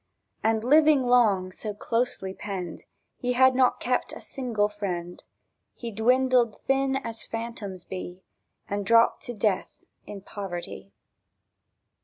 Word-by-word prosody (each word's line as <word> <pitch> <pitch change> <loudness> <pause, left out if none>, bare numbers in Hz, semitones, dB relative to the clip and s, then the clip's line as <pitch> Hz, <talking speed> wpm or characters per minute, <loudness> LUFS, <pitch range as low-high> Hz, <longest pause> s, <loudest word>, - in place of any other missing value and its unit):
And, 220 0 +2
living 300 +1 +5
long 215 -7 +3
so 210 +2 -6
closely 230 -4 -1
penned, 190 -4 -6 0.3
He 250 0 -1
had 260 +1 +5
not 255 -1 +3
kept 250 0 -1
a - - -7
single 235 -6 -1
friend; 180 -4 -5 0.5
He 235 -2 -6
dwindled 245 +1 +2
thin 270 0 +2
as 230 -4 -4
phantoms 225 -5 -6
be, 185 0 -7 0.4
And 205 0 -2
drooped 230 +3 +4
to 240 - -5
death 200 -2 -1 0.2
in 200 -1 -8
poverty 195 -1 -7
225 Hz, 125 wpm, -26 LUFS, 195-250 Hz, 0.5 s, living